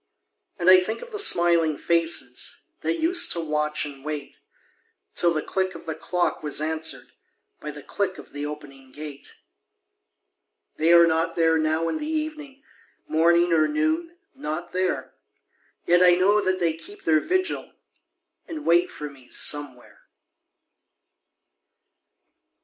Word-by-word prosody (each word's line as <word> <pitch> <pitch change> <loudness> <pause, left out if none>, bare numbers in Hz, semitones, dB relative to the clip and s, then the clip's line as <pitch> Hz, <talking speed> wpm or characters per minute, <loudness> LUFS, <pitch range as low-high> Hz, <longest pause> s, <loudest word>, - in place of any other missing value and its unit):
And 175 - -3
I 185 0 +9
think 220 +5 -4
of 485 - -12
the 420 - -3
smiling 170 - +4
faces 170 0 0 0.2
That 340 - -2
used 345 +2 +4
to 170 - -3
watch 150 -2 -1
and 140 -2 -10
wait, 150 -1 -6 0.7
Till 175 - +3
the 155 -2 -2
click 190 -1 -2
of - - -11
the 160 - -3
clock 175 +2 -2
was 150 -2 -3
answered 160 +1 -2 0.5
By 150 - -7
the 145 -1 -9
click 195 -2 -3
of - - -13
the 145 0 -5
opening 145 -3 -9
gate. 145 0 -9 1.4
They 160 +2 +3
are 170 0 +8
not 165 +1 0
there 165 -1 +3
now 160 +1 0
in 315 - -2
the 300 - -5
evening 305 -3 -5 0.4
Morning 170 +2 +3
or 155 -1 +4
noon 320 +2 -1 0.2
not 175 - -5
there; 185 0 -2 0.7
Yet 175 +1 +4
I 180 -1 +7
know 200 +4 +3
that 185 -1 0
they 170 -2 +1
keep 165 +6 -12
their 155 -1 +3
vigil, 370 - -2 0.8
And 315 -2 -7
wait 170 +1 +3
for 150 - -7
me 135 -3 -16
Somewhere. 145 -4 -2
170 Hz, 145 wpm, -24 LUFS, 155-195 Hz, 1.4 s, I